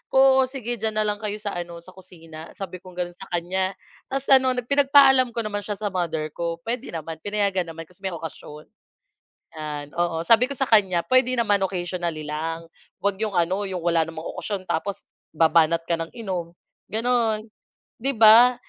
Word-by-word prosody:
"Oo, 265 0 +6
sige 240 -3 -5
diyan 220 0 -2
na 215 - +2
lang 205 -1 -1
kayo 210 -1 -3
sa 210 -1 -5
ano, 170 -1 -6
sa 185 - -14
kusina." 165 -3 -12
Sabi 185 -3 -7
kong 185 -1 -14
gano'n 175 -1 -3
sa 195 +2 -11
kanya. 185 +2 -1 0.3
Tapos 270 0 -3
ano, 260 -1 +6
pinagpaalam 270 -2 +5
ko 230 - -1
naman 205 -1 -3
siya 205 - -2
sa 205 -1 -3
mother 160 -4 -2
ko, 170 0 -4
pwede 235 -6 -4
naman, 160 0 -6
pinayagan 200 -2 0
naman 165 0 -7
kasi 180 +3 -23
may 190 -3 -4
okasyon. 155 -1 -9 0.8
'Yan, 150 -2 -5
oo. 170 -1 -1
Sabi 240 +3 +5
ko 280 - -6
sa 270 - +1
kanya, 190 -6 +3
"Puwede 255 -1 +3
naman 205 -4 +2
occasionally 175 -4 -3
lang. 165 +2 -4 0.3
Huwag 200 +1 0
'yong 200 -3 -2
ano, 185 +4 +1
'yong 190 -2 -3
wala 170 -1 +2
namang 160 0 -6
okasyon 195 -3 -5
tapos 195 +4 -3 0.2
babanat 165 +1 +3
ka 170 - +1
ng 165 0 -4
inom," 185 -7 -5 0.4
gano'n, 225 -1 +1 0.5
'di 270 +4 -1
ba? 230 +3 +8
190 Hz, 180 wpm, -24 LUFS, 170-225 Hz, 0.8 s, ba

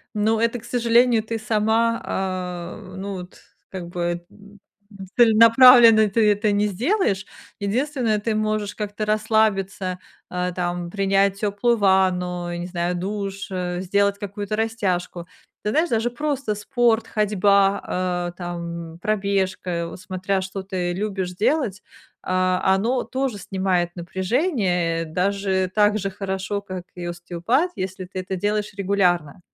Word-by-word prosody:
Но 220 +2 +1
это, 230 +1 +1
к 230 - -15
сожалению, 235 -1 +3
ты 225 0 -3
сама, 225 +1 +1
а, 185 -1 -4
ну, 200 +1 -5
вот 180 -1 -9 0.3
как 180 -3 -7
бы, 175 0 -3
м, 205 0 -17 0.3
м, 195 -2 -10
целенаправленно 230 -1 +7
ты 210 +1 +3
это 205 +1 +1
не 205 +1 +2
сделаешь. 210 - 0 0.3
Единственное, 230 +1 0
ты 220 +1 -1
можешь 215 -1 -1
как-то 210 0 -4
расслабиться, 210 -4 0 0.3
а, 180 0 -2
там, 175 -1 -3
принять 195 0 +1
теплую 210 +3 +1
ванну, 180 -3 +1
я 175 - -4
не 175 - -4
знаю, 175 0 -2
душ, 195 +2 -4
э, 180 -1 -2
сделать 200 +2 +1
какую-то 205 +1 -4
растяжку. 185 -6 -2 0.4
Ты 210 - 0
знаешь, 320 +8 +2
даже 230 +1 +1
просто 275 -3 -2
спорт, 230 +1 +1
ходьба, 195 -3 +1
э, - - -8
там, 170 -2 -6
пробежка, 190 -4 -1
вот 170 - -9
смотря, 185 +1 -2
что 190 +1 -5
ты 185 -2 -2
любишь 190 -2 -3
делать, 210 - 0 0.4
а, 185 0 +1
оно 235 +6 0
тоже 260 -4 -2
снимает 185 -2 -1
напряжение, 185 - 0
э, - - -6
даже 190 +2 0
так 210 0 +3
же 195 0 -2
хорошо, 195 +1 -3
как 185 -2 -7
и 175 -1 -6
остеопат, 175 - -1
если 185 0 -5
ты 185 +1 -6
это 185 +1 -4
делаешь 210 +2 -1
регулярно. 185 -5 0
195 Hz, 140 wpm, -23 LUFS, 180-215 Hz, 0.4 s, целенаправленно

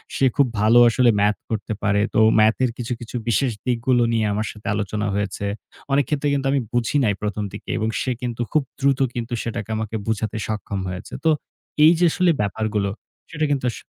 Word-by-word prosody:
সে 135 - +2
খুব 140 - +4
ভালো 110 +3 +6
আসলে 120 +1 +3
ম্যাথ 105 +1 +2
করতে 110 0 -3
পারে। 100 0 +2
তো - - +3 0.2
ম্যাথ 110 +1 +5
এর 125 - +2
কিছু, 125 0 -3
কিছু, 120 +1 -9
বিশেষ 125 +3 +2
দিকগুলো 120 0 +2
নিয়ে 110 -1 +1
আমার 105 +1 -1
সাথে 105 - -11
আলোচনা 105 0 -2
হয়েছে। 100 0 -2 0.5
অনেক 140 0 +3
ক্ষেত্রে 150 -1 0
কিন্তু 135 -1 0
আমি 140 - +2
বুঝি 120 +4 +1
নাই 105 - +2
প্রথম 105 0 -2
দিকে 105 - -9
এবং 110 0 0
সে 130 - -1
কিন্তু 120 -1 -3
খুব 155 - +2 0.2
দ্রুত 140 0 +2 0.4
সেটাকে 115 -2 -4
আমাকে 110 0 -4
বোঝাতে 110 -1 -1
সক্ষম 105 -2 -3
হয়েছে। 90 +3 -7
তো - - +5 0.5
এই 155 - +9
যে 175 - +4
আসলে 180 +1 +3
ব্যাপারগুলো 105 0 -1 0.4
সেটা 155 -1 -1
কিন্তু 135 -3 0
আস - - -9
110 Hz, 195 wpm, -22 LUFS, 105-130 Hz, 0.5 s, এই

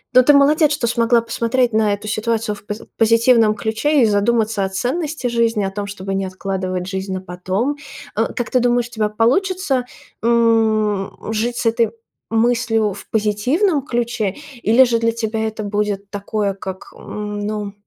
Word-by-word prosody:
но 255 - +9
ты 290 +4 +5
молодец, 295 +2 +4
что 290 -4 0
смогла 235 0 +3
посмотреть 235 +1 0
на 215 -1 +3
эту 205 +1 -10
ситуацию 220 0 -1
в 205 - -12
поз 210 +1 -5
позитивном 230 -1 +4
ключе 245 +7 +1
и - - +6
задуматься 215 0 +1
о 190 - -1
ценности 280 - -3
жизни, 230 -3 +1
о 195 - -2
том, 200 +1 -4
чтобы 195 -1 -5
не 195 0 -1
откладывать 185 -1 -3
жизнь 190 0 -4
на 185 - -2
потом. 185 +9 -2 0.4
Э, 225 +1 +1
как 240 - -3
ты 255 - +3
думаешь, 245 0 +1
у - - -30
тебя 215 -2 -1
получится, 265 - +1 0.4
м, 220 -3 +2 0.2
жить 235 +2 -1
с - - -3
этой 230 0 +2 0.4
мыслью 225 -2 +1
в 200 - -12
позитивном 255 - +1
ключе? 235 -4 -1 0.3
Или 230 +5 +5
же 235 -2 +1
для 230 0 +1
тебя 220 -1 -2
это 220 0 -5
будет 205 -1 -2
такое, 205 0 -2
как, 190 -1 -8
ну, 210 0 -5
225 Hz, 170 wpm, -19 LUFS, 205-240 Hz, 0.4 s, но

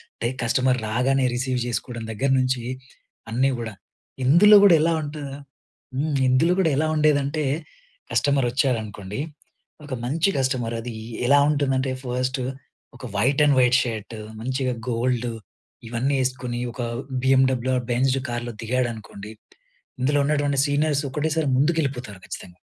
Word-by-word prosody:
అంటే 115 - -2 0.2
కస్టమర్ 130 +2 +2
రాగానే 130 +4 +1
రిసీవ్ 130 0 -1
చేసుకోవడం 120 -1 -4
దగ్గరనుంచి 130 +1 +1 0.7
అన్నీ 130 +4 +2
గూడా. 115 -2 -5 0.5
ఇందులో 185 +10 +7
గూడా 185 -4 +8
ఎలా 165 +1 +3
ఉంటది 145 -1 -6 0.6
హ్మ్, 145 +2 -1
ఇందులో 150 +8 +3
కూడా 175 -4 +3
ఎలా 155 +2 +2
ఉండేదంటే 150 0 +2 0.7
కస్టమర్ 140 -2 +2
వచ్చాడనుకోండి. 110 -6 -2 0.7
ఒక 145 - -6
మంచి 160 +9 +1
కస్టమర్ 130 -3 0
అది 120 0 -6 0.3
ఎలా 140 +2 +6
ఉంటుందంటే, 135 -3 +1
ఫస్ట్ 130 +1 -2 0.6
ఒక 125 - -10
వైట్ 135 +8 +2
అండ్ 145 -2 +4
వైట్ 125 0 +5
షర్ట్, 115 -2 -5 0.3
మంచిగా 130 +1 -1 0.2
గోల్డ్ 120 0 0 0.6
ఇవన్నీ 120 +5 0
వేసుకొని 125 -1 -2
ఒక 125 - -6 0.4
బిఎమ్‌డబ్ల్యూ 130 -1 +3
ఆర్ 125 - -3
బెంజ్ 130 +2 +2
కార్‌లో 120 0 -4
దిగాడనుకోండి. 115 -3 -3 0.7
ఇందులో 145 +3 +2
ఉన్నటువంటి 145 -1 +1
సీనియర్స్ 145 0 +1
ఒకటేసారి 155 +1 0
ముందుకు 155 +5 +2
వెళ్ళిపోతారు, 125 -8 -4
ఖచ్చితంగా. 90 -1 -9
130 Hz, 125 wpm, -23 LUFS, 120-145 Hz, 0.7 s, గూడా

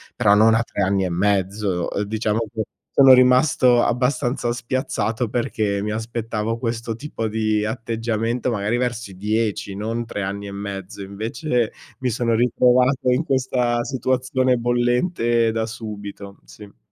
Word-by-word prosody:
però 105 -4 +4
non 110 +1 +5
a 115 - +2
3 100 - -4
anni 95 0 +1
e - - -1
mezzo. 95 0 0
Ehm, 100 - -1
diciamo 110 +1 -1
che 110 - -2 0.4
sono 135 -1 +9
rimasto 125 -1 +5
abbastanza 125 0 0
spiazzato, 120 -1 -2
perché 105 -4 -1
mi 105 +1 -2
aspettavo 115 0 -3
questo 115 -1 -3
tipo 115 -6 -4
di 110 -1 0
atteggiamento, 115 +1 -2
magari, 105 +2 -1
verso 120 -4 -2
i - - -12
10, 105 -1 -1
non 115 +3 -3
3 105 - -5
anni 100 +1 -4
e - - -7
mezzo. 100 -1 -6
Invece, 115 +5 -2 0.3
mi 130 -1 0
sono 115 0 0
ritrovato 125 +2 +3
in 130 +6 +2
questa 125 -4 0
situazione 130 -1 0
bollente 120 0 +1
da 110 0 -1
subito, 105 -3 -8
sì. 105 -1 -14
115 Hz, 145 wpm, -22 LUFS, 105-125 Hz, 0.4 s, sono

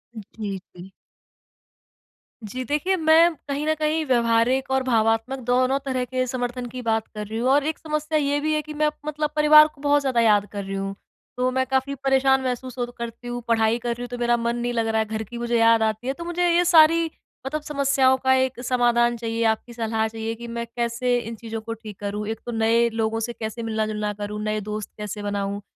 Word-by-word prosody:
जी, 205 -1 -6 0.2
जी। 180 +2 -11 1.5
जी, 255 +5 -5
देखिए 300 +8 0
मैं 325 +1 +5
कहीं 285 +2 -2
न 315 - +3
कहीं 310 +1 0
व्यवहारिक 240 +1 +2
और 265 0 +2
भावात्मक 225 +2 +1
दोनों 255 +2 +3
तरह 255 -2 -1
के 255 +1 -1
समर्थन 245 0 -3
की 250 +1 -7
बात 225 -1 0
कर 210 0 -4
रही 220 +1 -5
हूँ 255 +2 +1
और 280 +1 +4
एक 315 - -2
समस्या 305 0 -1
ये 285 0 +1
भी 310 +1 0
है 305 - +1
कि 305 0 -9
मैं 300 0 +2
प - - -28 0.2
मतलब 300 -1 0
परिवार 305 0 +8
को 280 - -19
बहुत 290 0 +3
ज़्यादा 255 -4 +1
याद 210 -2 +4
कर 200 -1 -4
रही 195 0 -5
हूँ। 195 0 -3 0.4
तो 255 0 +1
मैं 260 0 +1
काफ़ी 265 +1 0
परेशान 270 0 +2
महसूस 255 0 -4
होत 245 0 -3
करती 235 +1 -7
हूँ, 240 0 -4
पढ़ाई 225 0 +2
कर 240 0 -4
रही 235 +1 -3
हूँ 245 - -4
तो 245 - -5
मेरा 240 0 +2
मन 235 0 -1
नहीं 240 0 -2
लग 230 -1 0
रहा 220 0 +1
है, 220 - +1
घर 220 +1 -4
की 235 +3 -9
मुझे 235 0 0
याद 230 0 +5
आती 220 +3 -1
है, 270 - 0
तो 340 - -8
मुझे 350 +1 0
ये 345 +1 +3
सारी 330 -1 +6 0.4
मतलब 305 +3 -3
समस्याओं 275 -3 +2
का 260 0 +4
एक 260 -1 +1
समाधान 240 -1 +2
चाहिए, 230 0 -2
आपकी 225 +2 0
सलाह 225 -1 -1
चाहिए 225 0 -4
कि 235 +1 -9
मैं 235 0 -4
कैसे 240 +1 0
इन 230 0 -6
चीज़ों 225 0 -6
को 225 +1 -5
ठीक 215 -3 -11
करूँ? 205 +1 -4
एक 225 0 -4
तो 240 - -4
नए 230 +1 +3
लोगों 225 0 -1
से 235 +1 -3
कैसे 225 +1 -5
मिलना-जुलना 215 -1 -2
करूँ, 210 +1 -5
नए 215 0 -1
दोस्त 210 0 -5
कैसे 210 0 -5
बनाऊँ? 200 0 -2
240 Hz, 225 wpm, -23 LUFS, 220-270 Hz, 1.5 s, परिवार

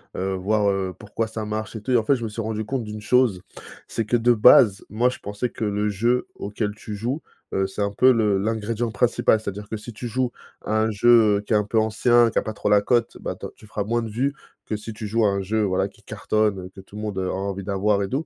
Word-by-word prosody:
heu, 95 +1 -2
voir, 100 +2 +1
heu, 95 -2 -1
pourquoi 105 +2 -3
ça 110 -1 -5
marche 110 +1 -4
et 110 - -5
tout? 130 - -4
Et 125 - +5
en 115 - +1
fait 135 +5 +3
je 120 - -5
me 115 - -2
suis 105 +2 -5
rendu 110 0 -3
compte 125 +3 -3
d'une 105 0 -7
chose, 110 -4 +2 0.5
c'est 115 - -2
que 115 +4 +1
de 120 +1 +3
base 105 -2 +6
moi 120 +4 +2
je - - -6
pensais 105 +4 -3
que 110 - -4
le 105 +1 0
jeu 120 +5 0
auquel 105 +1 -3
tu 105 -1 -7
joues, 120 +9 -3 0.3
heu, 95 0 +1
c'est 95 - -6
un 100 - 0
peu 130 +6 +5
le 105 -5 +2
l'ingrédient 110 +2 -2
principal 120 -1 +2
c'est-à-dire 105 -1 -6
que 110 - -4
si 110 +2 -9
tu 120 +3 -6
joues 125 +1 -1 0.3
à 110 - 0
un 110 +1 +1
jeu, 110 -1 +5
heu, - - -3
qui 105 - -3
est - - +5
un 105 - +3
peu 110 +2 +1
ancien 120 +2 +3
qui - - -5
a - - -2
pas 110 - -4
trop - - -2
la 105 -1 +5
cote, 120 +2 +1
bah, - - -4
ta - - -7
tu - - -17
feras 105 -1 -3
moins 115 +3 -1
de 110 - -5
vues 130 +6 0 0.3
que 110 - -2
si 105 +1 -8
tu 105 0 -6
joues 110 +1 +1
à - - +4
un 100 0 -1
jeu 110 +3 0
voilà 95 0 +1
qui - - -20
cartonne, 105 -3 0
heu, 90 - -8
que 95 - -10
tout 100 - -16
le - - -5
monde, 105 -2 -4
heu, 95 -1 -1
a - - -1
envie 100 0 -3
d'avoir 100 +1 +1
et - - -2
doux. 135 +9 -2
110 Hz, 285 wpm, -23 LUFS, 100-115 Hz, 0.5 s, base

